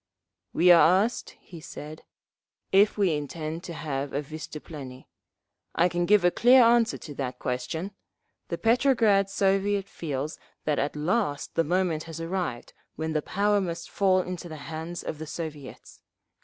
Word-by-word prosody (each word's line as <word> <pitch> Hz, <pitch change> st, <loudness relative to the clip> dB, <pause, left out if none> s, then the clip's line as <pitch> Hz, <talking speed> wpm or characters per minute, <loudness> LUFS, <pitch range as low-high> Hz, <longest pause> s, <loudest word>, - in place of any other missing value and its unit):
"We 180 Hz, +1 st, +5 dB
are 175 Hz, +3 st, +6 dB
asked," 235 Hz, +2 st, -4 dB
he 170 Hz, -3 st, -12 dB
said, 155 Hz, +1 st, -9 dB, 0.7 s
"if 200 Hz, +3 st, +4 dB
we 195 Hz, -5 st, +2 dB
intend 155 Hz, +3 st, -4 dB
to 170 Hz, -, -6 dB
have 140 Hz, -3 st, -4 dB
a 145 Hz, -, 0 dB
vystuplennie. 145 Hz, -3 st, -9 dB, 0.7 s
I 175 Hz, +2 st, +3 dB
can 175 Hz, 0 st, -1 dB
give 205 Hz, -3 st, +5 dB
a 175 Hz, -, +5 dB
clear 250 Hz, +5 st, +6 dB
answer 235 Hz, 0 st, +4 dB
to 150 Hz, -, -9 dB
that 130 Hz, -3 st, -4 dB
question. 145 Hz, +9 st, -3 dB, 0.6 s
The -, -, -3 dB
Petrograd 225 Hz, -5 st, +3 dB
Soviet 195 Hz, 0 st, +1 dB
feels 150 Hz, -4 st, -5 dB, 0.3 s
that 150 Hz, -1 st, +1 dB
at 145 Hz, +2 st, -1 dB
last 155 Hz, -1 st, -1 dB
the 165 Hz, -, +2 dB
moment 170 Hz, -1 st, 0 dB
has 165 Hz, -1 st, -8 dB
arrived 165 Hz, -7 st, -4 dB, 0.2 s
when 160 Hz, 0 st, -3 dB
the 155 Hz, -, +1 dB
power 205 Hz, +4 st, +1 dB
must 170 Hz, -2 st, -5 dB
fall 190 Hz, -2 st, +3 dB
into 180 Hz, -1 st, -6 dB
the 155 Hz, -, -7 dB, 0.2 s
hands 160 Hz, +2 st, -5 dB
of 155 Hz, -, -5 dB
the 160 Hz, -, -6 dB
Soviets. 150 Hz, -4 st, -8 dB
170 Hz, 155 wpm, -27 LUFS, 155-195 Hz, 0.7 s, are